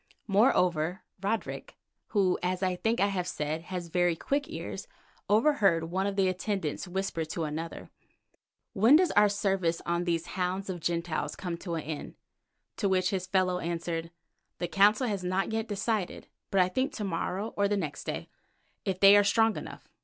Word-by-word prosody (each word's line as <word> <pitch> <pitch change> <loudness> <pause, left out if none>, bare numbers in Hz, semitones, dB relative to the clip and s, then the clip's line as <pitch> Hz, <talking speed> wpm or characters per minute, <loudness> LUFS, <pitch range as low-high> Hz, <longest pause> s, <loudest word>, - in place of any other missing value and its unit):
Moreover, 180 -5 +2 0.2
Roderick, 210 +2 -3 0.3
who, 195 -4 +2
as 180 +1 -1
I 185 -1 +1
think 225 +5 0
I 200 - +4
have 180 -3 -2
said, 155 -1 -2
has 180 -2 -5
very 175 0 +2
quick 280 - -1
ears, - - -6 0.4
overheard 210 - +4
one 190 +2 0
of 200 - -2
the 195 -1 +3
attendants 185 -3 -2
whisper 185 -2 -2
to 160 +1 -4
another: 160 +2 -5 0.8
"When 225 +9 +6
does 355 +2 +4
our 210 0 +5
service 195 -4 0
on 170 +1 0
these 170 -1 0
hounds 185 +2 -2
of 175 - -5
Gentiles 170 0 -2
come 175 -3 -4
to 170 -1 -4
an 160 - -3
end?" 155 -1 -6 0.6
to 200 - +1
which 185 +1 +2
his 185 -2 -2
fellow 185 -1 +1
answered, 165 -1 -3 0.5
"The 175 - -2
Council 205 +7 +4
has 200 -5 -2
not 185 +3 0
yet 225 0 -1
decided, 205 -2 -2 0.2
but 195 - +3
I 180 - +4
think 260 +9 -1
to 215 - -4
morrow 195 +3 -2
or 200 0 +2
the 205 0 0
next 150 -8 -4
day, - - -4 0.6
if 185 -1 -2
they 195 +1 +9
are 205 - +6
strong 225 +2 +3
enough. - - -8
185 Hz, 175 wpm, -29 LUFS, 175-205 Hz, 0.8 s, they